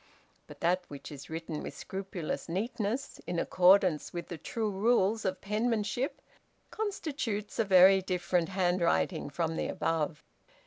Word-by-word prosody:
But - - -13
that 180 +2 +2
which 145 +1 -9
is 145 -1 -9
written 160 -1 -4
with - - -7
scrupulous 190 -5 -5
neatness, 220 +6 -2
in 175 - -2
accordance 180 -2 +4
with 175 -1 -6
the 170 - -5
true 220 +6 -2
rules 215 +1 +2
of 185 -1 -1
penmanship, 220 - -1 0.5
constitutes 290 - -3
a - - +5
very 190 0 +7
different 180 -2 0
handwriting 180 -3 +1
from 160 +3 -2
the - - -1
above. 160 -2 -1
185 Hz, 135 wpm, -31 LUFS, 170-210 Hz, 0.5 s, very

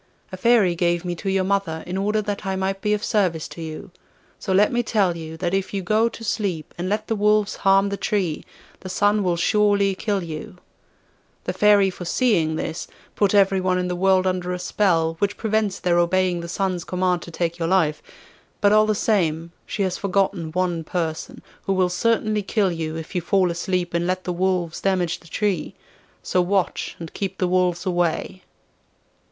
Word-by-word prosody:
A - - -5
Fairy 205 -2 +4
gave 175 0 0
me 175 - -1
to 195 - -3
your 190 0 +1
mother 190 -4 -1
in 180 - -5
order 210 +2 0
that 205 0 -4
I 190 -1 -2
might 190 +1 -2
be 210 0 +2
of 210 - -6
service 180 -7 0
to 170 - -9
you; 160 +3 -7 0.5
so - - -4
let 200 +3 +4
me 240 - +1
tell 200 -7 +1
you, 160 -1 -7
that 175 +1 -2
if 195 +1 -1
you 195 - -2
go 215 +5 +2
to 230 - -11
sleep 195 -8 -2
and 175 +1 -3
let 210 +1 -1
the 225 - -1
wolves 210 0 +2
harm 195 +1 +3
the 200 - -3
tree, 185 -8 -1 0.4
the 185 - -8
Sun 205 +3 +2
will 180 -3 +1
surely 200 +2 +3
kill 200 0 -2
you. 170 +5 -7 0.9
The - - -3
Fairy, 205 -2 +4
foreseeing 175 -3 +1
this, 160 +1 -4 0.3
put 205 0 +2
everyone 190 -2 +3
in 180 0 -1
the 180 - -1
world 190 +1 +3
under 180 -1 -1
a - - -2
spell, 170 -3 +1
which 205 0 0
prevents 215 -3 0
their 175 -1 +2
obeying 180 0 +1
the 170 - -6
Sun's 185 -2 -1
command 180 -1 0
to - - -9
take 170 0 -2
your 165 - 0
life. 160 -5 +2 0.6
But 205 - +4
all 215 0 +5
the 215 - +2
same, 170 -6 0 0.2
she 200 - -2
has 185 -1 -2
forgotten 195 -4 0
one 175 -1 -1
person, 160 -1 -4 0.2
who 195 - +2
will 185 -1 +2
certainly 215 +2 +1
kill 195 -1 +1
you 160 -2 -4
if 160 +2 -7
you 180 - 0
fall 185 +1 +2
asleep 175 0 -2
and 170 0 0
let 185 0 -1
the 180 - -2
wolves 180 -2 -1
damage 185 -3 0
the 170 - -18
tree. 195 -1 -2 0.5
So 180 - +1
watch 185 0 -1
and 165 -2 -9
keep 190 -1 -4
the 185 - +1
wolves 180 -1 +1
away. 175 +1 -1
185 Hz, 195 wpm, -23 LUFS, 175-200 Hz, 0.9 s, all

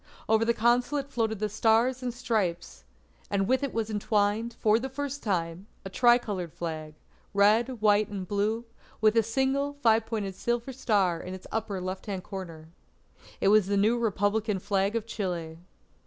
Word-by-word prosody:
Over 220 0 +3
the 235 - +3
Consulate 250 +5 +1
floated 225 -3 -1
the 215 +2 -1
Stars 225 +4 +2
and 250 -1 -2
Stripes, 210 - -2 0.4
and 195 -1 0
with 260 +3 +2
it 280 -3 -2
was 220 -1 -2
entwined, 210 +2 0
for 215 +1 +3
the 265 +3 -4
first 285 +1 -4
time, 175 -2 -2 0.2
a 195 - -6
tri 240 +2 +5
coloured 190 -8 -5
flag, 160 -2 -6 0.4
red, 220 +5 +3
white, 210 0 +4
and 195 -3 -6
blue, 215 +4 -1 0.3
with 215 0 +4
a 225 - +6
single 265 +5 0
five 225 -5 +2
pointed 210 -4 -3
silver 240 +6 -2
star 200 -9 +1
in 185 +1 -6
its 185 - -12
upper 215 -3 -2
left 185 +3 -5
hand 190 -3 -4
corner. 165 -5 -8 0.7
It - - +3
was 210 -2 +5
the 200 0 +1
new 215 +4 +3
Republican 215 -2 0
Flag 195 +2 0
of 225 -2 -1
Chile. 175 -7 -4
215 Hz, 170 wpm, -28 LUFS, 195-235 Hz, 0.7 s, a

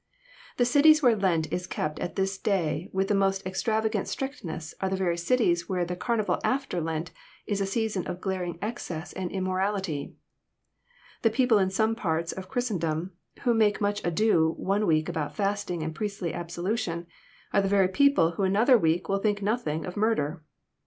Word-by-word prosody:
The 245 - +3
cities 305 +5 +6
where 240 -3 +6
Lent 180 -6 0
is 180 0 -2
kept 150 -3 -3
at 175 - -4
this 195 0 -1
day 170 -5 0
with 190 0 0
the 210 - +1
most 195 -1 +1
extravagant 215 +2 0
strictness 170 - -5
are 190 - 0
the 190 - 0
very 185 -3 0
cities 175 -1 +1
where 180 -2 0
the 180 +1 -4
carnival 220 +2 0
after 255 -10 0
Lent 160 +1 -3 0.3
is 200 -1 -1
a 195 - 0
season 210 -3 -1
of 175 - -4
glaring 180 -3 -3
excess 180 -7 -5
and 185 -2 -3
immorality. 185 -5 -2 1.1
The 225 - +4
people 230 -1 +3
in 190 -1 +2
some 220 +3 +1
parts 165 -6 -1
of 190 0 -8
Chris 245 -2 -1
tendom, 165 -1 -2 0.3
who 245 -3 +3
make 215 -2 +3
much 205 0 -1
ado 170 -3 +2
one 205 +2 0
week 155 -1 +2
about 160 -4 -3
fasting 200 -4 -1
and 160 0 -3
priestly 200 -4 -3
absolution, 175 +1 -3 0.5
are 200 - +4
the 195 - 0
very 195 -2 +4
people 235 - +4
who 185 +4 -3
another 220 +6 +5
week 165 -1 +1
will 195 0 +1
think 205 0 0
nothing 195 -8 -1
of 180 - -6
murder! 180 -8 0
190 Hz, 180 wpm, -27 LUFS, 170-215 Hz, 1.1 s, cities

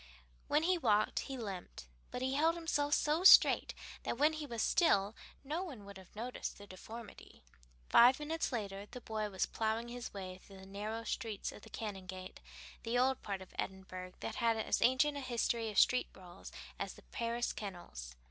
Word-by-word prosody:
When 300 +2 +3
he 360 +1 +2
walked 215 -6 +2
he 270 -1 -5
limped, 195 - -6 0.2
but 250 - -4
he 260 +1 0
held 320 +4 +3
himself 295 -3 +1
so 305 +4 +1
straight 380 - +8 0.3
that - - -3
when 300 +4 +4
he 310 -1 -5
was 235 -3 -2
still 205 - +3 0.3
no 310 +6 -2
one 260 - -8
would 200 -1 -10
have 190 +1 -17
noticed 240 +4 -5
the 205 - -11
deformity. 215 - -11 0.4
Five 245 +2 +7
minutes 315 +2 -2
later 200 -4 -4
the 250 - -8
boy 215 -2 -3
was 190 -2 0
plowing 225 +1 -2
his 245 0 -6
way 185 -2 -7
through 195 +1 -15
the 190 - -12
narrow 210 +4 -4
streets 225 -2 -3
of - - -12
the - - -13
Canongate, 190 -3 -6 0.4
the 235 +1 -1
old 260 +1 +2
part 195 -2 -4
of 185 - -18
Edinburgh 185 -1 -5
that - - -4
had 230 -2 +2
as 220 - 0
ancient 270 +4 +4
a - - -4
history 235 -2 0
of 210 - -6
street 250 - +4
brawls 180 -1 -12 0.3
as - - -4
the - - -16
Paris 235 +1 -2
kennels. 120 - -7
225 Hz, 185 wpm, -35 LUFS, 195-260 Hz, 0.4 s, straight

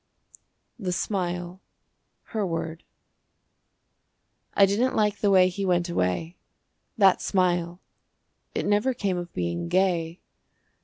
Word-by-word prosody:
THE 190 -4 -2
SMILE 175 0 -3 0.6
(Her 215 -2 -3
Word) 165 -2 -4 1.7
I 200 - +7
didn't 220 +7 +1
like 210 -1 +1
the 205 - +2
way 185 -2 +6
he 185 +2 -4
went 175 -2 +1
away. 160 - -1 0.6
That 195 -4 +5
smile! 175 -2 0 0.8
It - - -1
never 210 +5 +2
came 195 -6 -1
of 175 -1 -7
being 85 -1 -2
gay. 170 - +1
180 Hz, 110 wpm, -26 LUFS, 170-200 Hz, 1.7 s, I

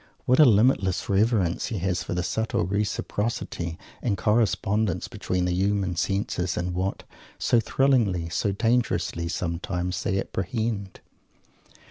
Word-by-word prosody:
What 130 +3 +3
a 155 - +9
limitless 100 -5 +3
reverence 100 -3 +2
he 110 - -3
has 90 -1 -1
for - - -4
the 90 - 0
subtle 110 -1 -1
reciprocity 100 -3 -2 0.2
and 105 -5 0
correspondence 105 -2 +1
between 90 -1 -2
the 90 - 0
human 95 -1 0
senses 90 -1 -1
and 90 0 -2
what 95 +2 -2 0.3
so 120 - +3
thrillingly, 110 -8 +2
so 100 +4 0
dangerously, 100 -6 0
sometimes! 90 +1 -2
they 95 +1 0
apprehend. 100 +1 -3
95 Hz, 125 wpm, -26 LUFS, 90-110 Hz, 0.3 s, a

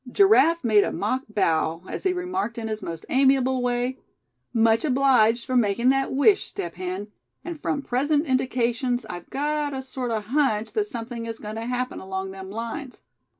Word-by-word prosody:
Giraffe 335 - +5
made 215 -3 +5
a - - -2
mock 255 +6 -1
bow, 165 -4 0
as - - -6
he 375 - +4
remarked 360 -8 -3
in 225 -1 -3
his 215 0 -3
most 165 -1 -6
amiable 265 -1 +3
way: 245 +1 -1 0.5
"Much 225 -1 +3
obliged 250 -5 +3
for 255 - -2
making 235 +1 +3
that 270 0 +2
wish, 335 +10 +3
Step 170 -1 -5
Hen; 185 +3 -5 0.4
and 335 -3 -6
from 280 - -1
present 290 +5 +1
indications 250 -2 0
I've 175 -1 -8
got 295 0 -1
a 265 - -4
sort 260 -1 -4
of 220 -2 -2
hunch 225 -4 0
that 425 -2 +1
something 235 - -6
is 225 -1 -5
going 210 0 -7
to 225 +1 -5
happen 250 0 -2
along 190 0 -4
them 190 0 -9
lines. 230 +5 -6
245 Hz, 180 wpm, -25 LUFS, 215-275 Hz, 0.5 s, Giraffe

